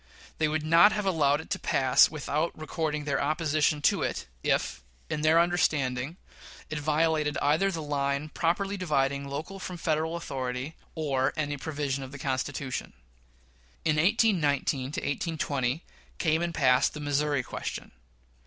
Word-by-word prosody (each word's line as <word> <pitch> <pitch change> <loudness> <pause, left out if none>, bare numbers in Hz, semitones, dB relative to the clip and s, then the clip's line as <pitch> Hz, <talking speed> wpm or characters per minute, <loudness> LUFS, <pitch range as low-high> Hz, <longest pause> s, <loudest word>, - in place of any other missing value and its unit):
They 155 - +3
would 155 0 -1
not 165 +6 +6
have 210 -1 -2
allowed 150 -5 +2
it - - -16
to - - 0
pass 130 -1 +4
without 155 +2 -2
recording 155 -1 -2
their 140 -2 0
opposition 150 -1 +1
to - - +3
it, - - -2 0.2
if, - - 0 0.3
in 150 - -1
their 160 +2 +5
understanding, 150 -4 +1 0.5
it 155 - -2
violated 155 0 +1
either 155 +7 +2
the 165 -4 -4
line 140 0 -1
properly 195 +6 0
dividing 140 -5 0
local 155 +8 -5
from 180 -1 -6
Federal 160 0 0
authority, 135 -2 -4 0.2
or 135 -5 0
any 145 -1 -1
provision 140 -2 -3
of 130 - -9
the 140 - -8
Constitution. 135 0 -3 0.9
In 155 -1 +2
1819 155 - +1
20 140 +1 -1 0.3
came 160 -1 +1
and 170 0 -1
passed 130 0 +3
the - - -5
Missouri 145 -1 0
question. - - -6
150 Hz, 145 wpm, -28 LUFS, 140-160 Hz, 0.9 s, not